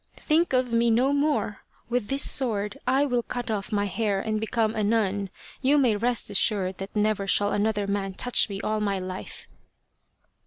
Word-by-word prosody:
" - - -35
Think 330 +2 +1
of 255 -2 +1
me 235 0 +3
no 250 +5 +3
more! 285 -7 0 0.3
With 240 -2 -1
this 275 +1 +3
sword 210 -6 +1
I 270 +3 +3
will 245 -3 0
cut 245 0 -4
off 200 -2 -3
my 205 -1 +1
hair 205 0 -1
and 215 +1 -2
become 220 0 0
a 215 -2 -1
nun. 205 -2 0 0.3
You 280 +3 +3
may 250 -6 +3
rest 235 0 -1
assured 195 -2 0
that 195 +2 -7
never 210 -1 0
shall 205 +1 +2
another 205 0 0
man 200 -1 -2
touch 245 0 +2
me 195 -1 -5
all 215 0 -1
my 200 -2 0
life." 185 0 -7
215 Hz, 190 wpm, -26 LUFS, 200-245 Hz, 0.3 s, me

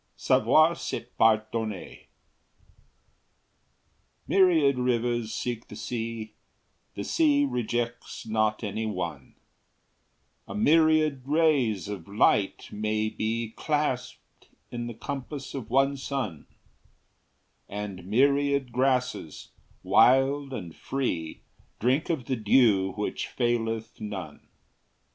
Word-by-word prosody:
SAVOIR 155 +9 +4
C'EST 120 -7 -6
PARDONNER. 110 -2 0 2.2
Myriad 160 -9 +4
rivers 120 -2 0
seek 120 -1 -4
the 105 - -10
sea, 115 -1 -5 0.6
The - - -4
sea 290 -3 +3
rejects 120 - -3
not 110 0 0
any 110 +2 -2
one; 90 -5 -5 1.1
A - - -7
myriad 155 +2 +3
rays 140 - +2
of 100 -5 -6
light 100 -1 +2
may 110 +1 -1
be 110 +1 -3
Clasped 145 -5 -3 0.2
in 120 -1 -4
the 120 - -7
compass 140 +2 -6
of 130 -5 -6
one 135 +1 +3
sun; 130 - -4 1.2
And 100 -2 -6
myriad 140 +3 +2
grasses, 125 - -1 0.3
wild 135 +2 +4
and 90 -10 -6
free, 90 -13 -3 0.4
Drink 130 +6 +1
of 155 -8 -1
the 130 - -1
dew 105 -4 +3
which 105 - -3
faileth 115 -3 -2
none. 105 -4 -7
120 Hz, 100 wpm, -27 LUFS, 110-135 Hz, 2.2 s, SAVOIR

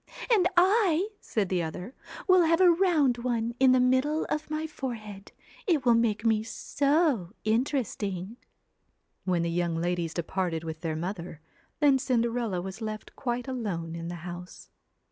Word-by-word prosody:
4 455 - +7
And 360 -2 +4
I/ 380 0 +4
said 205 -5 -2
the 180 -2 +1
other, 175 - -5 0.2
' - - -11
will 370 -1 +6
have 330 0 +3
a 365 -2 +7
round 325 -9 +3
one 235 -1 -1
in 260 -1 +6
the 255 - +5
middle 260 +5 +2
of 305 0 -2
my 310 +1 -2
forehead. 220 -9 -7 0.4
It 310 -8 +2
will 240 - +6
make 230 -2 +1
me 220 -1 +3
so 275 - 0
interesting.' 220 -4 -1 0.9
When 180 -3 +1
the 170 - -1
young 170 -1 0
ladies 170 0 -1
departed 170 -1 -2
with 160 -1 -6
their 160 -2 -2
mother, 170 -1 -5 0.4
then 280 -2 +5
Cinderella 235 -7 0
was 190 +3 -7
left 215 -1 -6
quite 245 0 -3
alone 195 -11 -3
in 165 0 -5
the 175 - -5
house. 180 0 -9
230 Hz, 165 wpm, -28 LUFS, 180-280 Hz, 0.9 s, 4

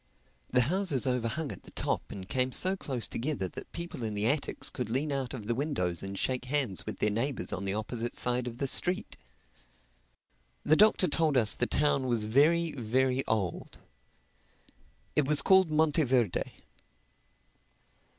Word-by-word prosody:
The 125 - +3
houses 160 -1 +1
over 125 -3 0
hung 145 +5 -3
at - - -9
the - - -15
top - - -3
and 95 -2 -8
came 130 +2 0
so 185 +8 +2
close 130 -10 -2
together 125 -6 -2
that - - -10
people 170 -6 -6
in 110 -2 -3
the 105 +1 -1
attics 140 +5 0
could 125 -3 -4
lean 140 +6 -1
out 135 -3 -2
of 115 -6 -7
the 120 - 0
windows 115 - -1
and 95 0 -6
shake 130 +3 -1
hands 130 -8 -1
with - - -4
their 105 - +1
neighbors 125 +5 -2
on 95 - -4
the 100 +1 -1
opposite 115 +2 -4
side 125 0 0
of 120 -1 -6
the 140 - -1
street. 180 +7 +1 1.5
The 155 - +4
Doctor 210 -1 +4
told 155 -2 +2
us 110 -4 +4
the 120 - -1
town 140 -3 +1
was 120 -3 +1
very, 155 +8 +3
very 130 +1 0
old. 105 -6 -2 1.4
It 150 -3 +2
was 150 -1 +5
called 190 -3 +5
Monteverde. 150 - +2
130 Hz, 165 wpm, -30 LUFS, 115-150 Hz, 1.5 s, was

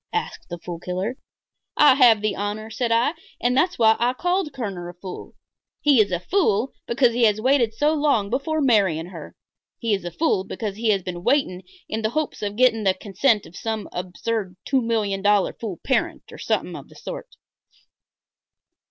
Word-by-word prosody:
asked 440 - -4
the 175 - -5
Fool 170 0 -7
Killer. 185 +7 -3 0.6
"I 295 -3 +7
have 240 -5 +5
the 215 -2 0
honor," 210 +2 -4
said 235 +1 -1
I, 235 +6 +3 0.3
"and 245 +1 +1
that's 350 +6 +2
why 220 -1 +5
I 245 +1 +2
called 355 +2 -1
Kerner 195 -9 -5
a 175 - -11
fool. 180 0 -9 0.4
He 280 -6 +5
is 200 -2 0
a 175 - 0
fool 245 - +1
because 235 0 +3
he 240 0 +3
has 215 -1 +3
waited 245 -2 +2
so 295 +5 +2
long 280 -10 +1
before 310 +5 -1
marrying 195 - +2
her. - - -10 0.4
He 230 -4 -1
is 195 - -1
a 175 - -4
fool 190 - 0
because 205 +1 -5
he 225 0 0
has 195 -3 +2
been 175 -1 -6
waiting 245 -8 +1 0.3
in 220 - -3
the 220 - 0
hopes 310 +4 -3
of 205 -1 -3
getting 230 -2 +3
the 190 -2 +3
consent 210 +3 +1
of 170 - -14
some 220 -2 -3
absurd 185 +2 -3
two 270 -2 +2
million 215 -4 -1
dollar 205 -1 +3
fool 205 -7 -6
parent 265 - 0
or - - -11
something - - -1
of - - -10
the - - -17
sort." - - -8
220 Hz, 190 wpm, -23 LUFS, 195-260 Hz, 0.6 s, I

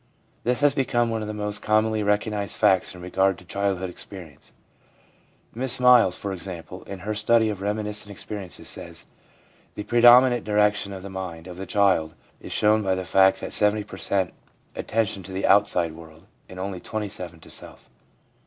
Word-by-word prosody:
This 125 +3 0
has 145 -1 +4
become 120 -4 0
one 110 -1 -2
of 105 - -5
the - - -3
most 105 0 -2
commonly 110 0 +1
recognised 105 0 -1
facts 95 0 +2
in 90 - -11
regard 95 +1 +1
to 90 - -16
childhood 95 -1 -1
experience. 85 -6 -11 1.0
Miss 125 +2 -1
Miles, 125 -7 +6
for 100 -1 -5
example, 90 0 -8
in 95 -2 -8
her 105 +4 -3
study 110 +1 +3
of 100 -2 -7
reminiscent 105 0 -3
experiences, 100 -2 -7
says: - - -8
1 - - -35 0.6
The 105 - -5
predominant 120 +2 +6
direction 105 -1 +1
of 95 -1 -8
the 100 - -8
mind 90 -4 -6
of 90 -1 -9
the 95 - -7
child 95 -6 +2 0.2
is - - -10
shown 110 +1 +3
by 95 -2 0
the 95 0 -4
fact 95 +2 +4
that - - -2
70 105 0 +3
show 95 +2 0 0.5
attention 110 -2 -1
to 95 - -11
the 95 +1 -2
outside 95 -4 +3
world, 80 +1 -14 0.2
and 95 - -10
only 95 -1 -4
27 90 -5 -5
to - - -12
self. - - -7
100 Hz, 175 wpm, -24 LUFS, 95-110 Hz, 1.0 s, Miles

